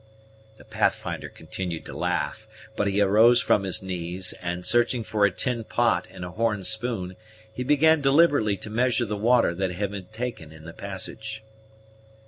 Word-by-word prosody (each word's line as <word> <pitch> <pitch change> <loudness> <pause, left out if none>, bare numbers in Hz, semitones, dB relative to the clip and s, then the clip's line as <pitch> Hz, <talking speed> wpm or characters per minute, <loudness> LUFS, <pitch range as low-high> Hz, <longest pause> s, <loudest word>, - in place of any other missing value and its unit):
The - - -16
Pathfinder - - -1
continued 90 -4 -6
to - - -8
laugh; 110 - -2 0.3
but 105 - 0
he 100 +1 +1
arose 110 +5 +6
from 105 - +3
his 95 -1 -1
knees, 90 0 -2
and, 90 0 -4
searching 120 0 +2
for 105 -1 +2
a - - -3
tin 115 +5 -2
pot 115 -6 +1
and 90 - -8
a 90 - -7
horn 105 0 -1
spoon, 110 -4 -2 0.4
he 125 - -4
began 150 +3 +4
deliberately 140 -7 +4
to 110 +3 -8
measure 120 +1 +1
the 105 -1 -3
water 115 -2 +3
that 95 +1 -2
had 100 +2 -2
been 95 -3 -7
taken 110 -7 -6
in 80 0 -14
the 85 - -9
passage. 110 +3 -6
105 Hz, 170 wpm, -25 LUFS, 95-120 Hz, 0.4 s, arose